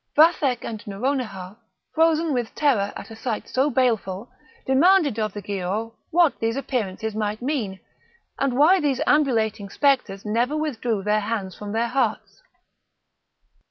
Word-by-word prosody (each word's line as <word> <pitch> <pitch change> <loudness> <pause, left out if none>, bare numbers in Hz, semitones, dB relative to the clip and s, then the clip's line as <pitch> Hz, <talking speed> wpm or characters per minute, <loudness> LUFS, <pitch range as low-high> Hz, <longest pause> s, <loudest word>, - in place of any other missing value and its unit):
Vathek 300 -6 +4
and 220 -2 -6
Nouronihar, 205 -3 -3 0.4
frozen 325 -1 +2
with 240 -3 -2
terror 235 -10 +2
at - - -9
a - - -8
sight 225 -1 -4
so 265 +3 +1
baleful, 235 -5 0 0.3
demanded 285 - +4
of 215 -1 -1
the 205 - -7
Giaour 200 +4 -3 0.2
what 340 -2 +3
these 225 +1 0
appearances 220 -6 -3
might 210 0 -2
mean, 235 -9 -2 0.6
and 265 -2 0
why 340 +7 +6
these 285 -5 0
ambulating 225 -8 +1
spectres 255 -7 +1
never 240 +8 0
withdrew 240 -9 -2
their 210 +1 +2
hands 205 -3 -3
from 205 -1 -7
their 230 +2 0
hearts. 250 -3 -2
230 Hz, 140 wpm, -23 LUFS, 210-280 Hz, 0.6 s, why